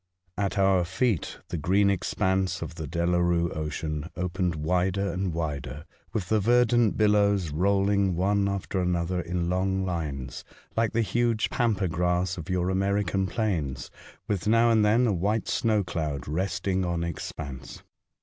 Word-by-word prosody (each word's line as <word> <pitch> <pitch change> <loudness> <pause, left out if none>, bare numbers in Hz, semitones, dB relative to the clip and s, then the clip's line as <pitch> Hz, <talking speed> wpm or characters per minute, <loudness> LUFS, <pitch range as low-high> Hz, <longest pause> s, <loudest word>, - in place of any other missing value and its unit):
At 100 +1 -1
our 95 -2 +4
feet 95 +2 -1
the 85 - -3
green 100 +6 +3
expanse 95 0 0
of - - -7
the 80 -2 -6
Delarue 85 +1 +1
Ocean 75 +1 -4
opened 90 -1 -1
wider 90 +5 0
and 95 -1 -1
wider, 75 -3 -4 0.3
with 95 -5 -3
the 110 - +3
verdant 120 0 +3
billows 100 -5 +3
rolling 100 +2 +2
one 100 +3 +1
after 100 -1 -2
another 90 0 0
in 85 +1 -2
long 95 +1 0
lines, 75 -8 -4 0.3
like 115 -2 +1
the 115 0 +2
huge 115 0 0
pampa 110 -7 +1
grass 90 +2 0
of 85 -4 -8
your 90 0 0
American 100 0 0
plains, 85 - -2 0.4
with 105 -2 -2
now 115 +2 +4
and 110 -2 +4
then 115 +4 +4
a 110 - +2
white 100 +5 0
snow 110 -3 +1
cloud 75 -6 -3
resting 95 +3 -1
on 85 -1 -1
expanse. 75 -4 -6
95 Hz, 150 wpm, -27 LUFS, 85-100 Hz, 0.4 s, our